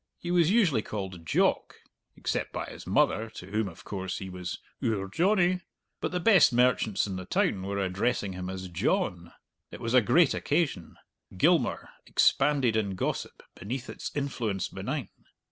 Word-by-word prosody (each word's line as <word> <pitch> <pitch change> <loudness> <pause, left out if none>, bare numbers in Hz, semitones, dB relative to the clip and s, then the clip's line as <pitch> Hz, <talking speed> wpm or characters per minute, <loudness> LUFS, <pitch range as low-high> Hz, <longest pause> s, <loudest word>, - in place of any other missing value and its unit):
He 175 - -5
was 175 -2 +4
usually 185 - +3
called 95 -6 -6
"Jock" - - +1 0.4
(except - - -2
by - - -4
his - - -10
mother, 110 +1 +2
to 90 +2 -9
whom, 110 0 0
of 85 -3 -11
course, 95 -2 -4
he 95 -1 -6
was 90 -1 -5 0.3
"oor 100 -4 0
Johnny"), 180 - +2 0.4
but - - -2
the 180 - -1
best 180 -5 +6
merchants 120 -4 +2
in 95 -2 -4
the 95 - -6
town 95 - +1
were 100 +1 -3
addressing 100 +2 -1
him 90 0 -5
as 95 0 -5
"John." 85 0 -1 0.4
It - - -9
was 115 0 -3
a 130 - +7
great 135 +7 +4
occasion. 145 - -1 0.4
Gilmour - - +2 0.2
expanded 135 -5 +3
in 100 -3 0
gossip - - -3
beneath 120 +7 -5
its - - -6
influence 120 -9 -2
benign. - - -4
110 Hz, 160 wpm, -28 LUFS, 95-140 Hz, 0.4 s, a